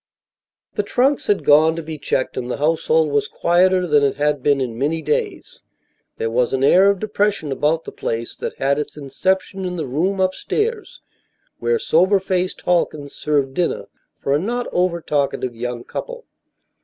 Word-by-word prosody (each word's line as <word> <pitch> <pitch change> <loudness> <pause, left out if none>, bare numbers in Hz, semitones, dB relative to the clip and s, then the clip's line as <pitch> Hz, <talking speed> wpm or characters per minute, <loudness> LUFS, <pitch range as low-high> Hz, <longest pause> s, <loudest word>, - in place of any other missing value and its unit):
The - - 0
trunks 260 +7 +1
had 205 - +1
gone 155 +2 +5
to 165 - -5
be 155 -1 -7
checked, 130 - -1
and 125 -1 -4
the - - -2
household 155 +1 +2
was 145 0 +1
quieter 180 +1 +2
than 150 -4 +3
it 140 -1 +1
had 145 0 0
been 140 0 +2
in 125 -4 -3
many 145 +7 -1
days. 150 -1 -3 0.6
There 115 - -2
was 125 +2 +1
an 135 0 0
air 185 +7 +6
of 200 - +2
depression 205 -6 -1
about 155 +4 +1
the - - -8
place 115 +1 -4
that - - -5
had 140 +2 +1
its 150 - -5
inception 190 +7 -1
in 180 -1 -3
the 165 - -3
room 175 +10 -1
upstairs 430 - -2 0.6
where 470 0 +1
sober 190 - +3
faced 185 -1 -2
Halkins 155 -5 0
served 140 -3 0
dinner 175 +4 -1 0.3
for 140 - -1
a 145 - +3
not 240 +7 -2
over 175 -1 0
talkative 140 -5 -1
young 120 0 -4
couple. - - -7
160 Hz, 175 wpm, -20 LUFS, 140-190 Hz, 0.6 s, air